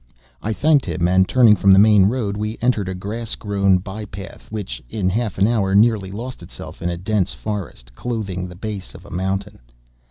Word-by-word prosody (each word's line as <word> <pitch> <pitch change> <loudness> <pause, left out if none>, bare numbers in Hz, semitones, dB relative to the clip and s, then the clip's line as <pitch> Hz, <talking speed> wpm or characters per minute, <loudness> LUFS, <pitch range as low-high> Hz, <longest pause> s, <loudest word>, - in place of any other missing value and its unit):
I 110 - -2
thanked 145 +4 +2
him, 85 -1 0
and, 95 +1 +3
turning 120 -5 +6
from 100 -1 +4
the 95 - +8
main 105 -1 +6
road, 105 -3 -1
we 105 +2 -3
entered 110 -6 +1
a 95 - -4
grass 110 +5 -4
grown 100 -2 +2
by 100 +4 -6
path, 100 +1 -10
which, 100 - -5
in 100 -4 -1
half 110 -1 -2
an 100 - +4
hour, 100 -4 +1
nearly 105 -2 +3
lost 115 +5 -7
itself 85 - -10
in 90 - -1
a 85 - -3
dense 95 +1 0
forest, 80 - -6
clothing 95 - -4
the 90 - -11
base 100 0 -6
of - - -13
a - - -13
mountain. 95 +3 -3
100 Hz, 200 wpm, -21 LUFS, 95-110 Hz, -, the